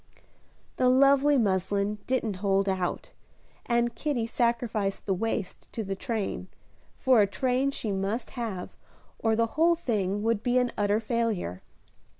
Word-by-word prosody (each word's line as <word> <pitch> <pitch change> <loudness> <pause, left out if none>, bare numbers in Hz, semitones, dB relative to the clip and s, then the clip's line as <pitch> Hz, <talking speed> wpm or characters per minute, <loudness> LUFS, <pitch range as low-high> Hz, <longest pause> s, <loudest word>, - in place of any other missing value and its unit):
The 255 - +4
lovely 275 +2 +5
muslin 200 -1 0
didn't 235 -6 0
hold 195 0 +1
out, 185 -2 -2 0.6
and 235 0 +1
Kitty 265 -4 -1
sacrificed 230 -4 -1
the 195 - +1
waist 210 0 -3
to 225 - -3
the 195 -1 -3
train, 210 -4 -3 0.5
for 255 -4 +4
a 200 - +4
train 255 +5 0
she 230 -6 -3
must 200 +5 -2
have 220 -7 -5 0.4
or 225 -1 +2
the 230 +1 +3 0.2
whole 340 +1 +6
thing 205 - -1
would 225 -2 +1
be 245 +2 +1
an 250 -1 +2
utter 205 +1 +2
failure. 220 - -2
225 Hz, 145 wpm, -28 LUFS, 200-245 Hz, 0.6 s, whole